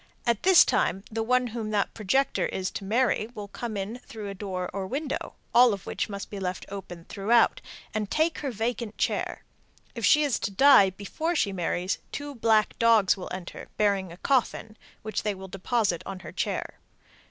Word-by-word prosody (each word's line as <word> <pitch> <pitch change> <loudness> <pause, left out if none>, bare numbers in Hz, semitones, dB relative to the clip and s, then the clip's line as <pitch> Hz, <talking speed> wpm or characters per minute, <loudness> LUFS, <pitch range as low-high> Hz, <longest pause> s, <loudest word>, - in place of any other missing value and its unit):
At 235 -3 +1
this 370 -2 +7
time 190 +2 +1
the 225 +1 -2
one 250 +2 +2
whom 225 -3 -3
that 205 -2 0
projector 250 +6 +1
is 185 0 -3
to - - -6
marry 225 +1 +1
will 205 -1 -6
come 220 +1 -5
in 205 +5 -4
through 215 -4 -8
a - - -5
door 185 -2 -4
or 195 -1 -3
window 280 +5 -4 0.2
(all 245 -2 +7
of 195 - -6
which - - -3
must 200 -1 -6
be 200 - -5
left 180 -1 -3
open 180 -4 -8
throughout) 225 +3 +2 0.3
and 215 -2 -2
take 315 +2 +1
her 285 - -3
vacant 230 -1 -3
chair. - - -1 0.5
If - - -7
she 300 0 +5
is 280 -6 +1
to - - -2
die 200 -1 +6
before 205 - -3
she 200 -10 +1
marries, 180 +1 -1
two 290 0 -5
black 220 -3 +2
dogs 225 -4 +5
will 190 - -7
enter, 180 -1 -7
bearing 200 -4 +1
a 170 - -11
coffin, 235 -3 0 0.3
which 215 -2 -2
they 210 -2 -1
will 190 0 -9
deposit 195 -1 0
on 190 -1 -7
her - - -9
chair. - - -3
210 Hz, 190 wpm, -27 LUFS, 195-240 Hz, 0.5 s, this